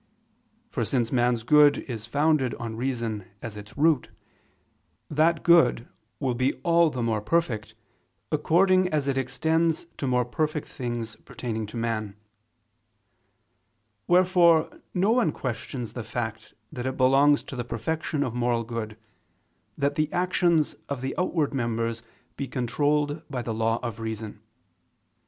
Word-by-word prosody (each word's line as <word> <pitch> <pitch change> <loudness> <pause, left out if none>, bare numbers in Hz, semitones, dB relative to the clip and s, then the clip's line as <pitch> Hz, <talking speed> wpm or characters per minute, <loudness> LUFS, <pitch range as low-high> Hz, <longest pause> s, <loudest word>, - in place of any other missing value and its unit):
For - - -1
since 120 -4 0
man's 120 -2 +2
good 145 +2 +6
is 115 -4 -6
founded 145 -1 +2
on 115 -1 -5
reason 115 -4 -2 0.2
as 110 0 -7
its 105 +3 -11
root, 150 -3 +3 1.0
that 160 +2 +2
good 135 -9 +4 0.3
will 130 -3 0
be 130 +3 +1
all 170 -1 +4
the 125 -5 -3
more 110 -2 0
perfect, 110 -5 -1 0.6
according 185 +5 +3
as 150 -4 -1
it 135 - +1
extends 160 +6 0
to 140 - -2
more 125 -1 +2
things 120 -5 -3
pertaining 110 -3 -5
to 110 - -8
man. 110 -3 -2 1.9
Wherefore 175 -2 +4
no 190 +4 +3
one 235 -9 +3
questions 120 -2 -5
the 120 - -5
fact 110 -1 -5 0.2
that 125 0 -4
it 130 - -3
belongs 135 +3 +4
to - - -8
the 120 - -3
perfection 145 +6 -2
of 125 -5 -3
moral 120 -1 0
good, 110 -2 -5 0.8
that 140 0 +1
the 155 +1 0
actions 175 -3 +2 0.2
of 140 -3 -3
the 135 +1 -2
outward 165 -5 0
members 115 -2 -1 0.4
be 140 - -3
controlled 145 +5 0
by 125 -4 -3
the 115 - -3
law 115 +1 +1
of 115 -3 -4
reason. 110 -1 -5
130 Hz, 140 wpm, -26 LUFS, 115-155 Hz, 1.9 s, good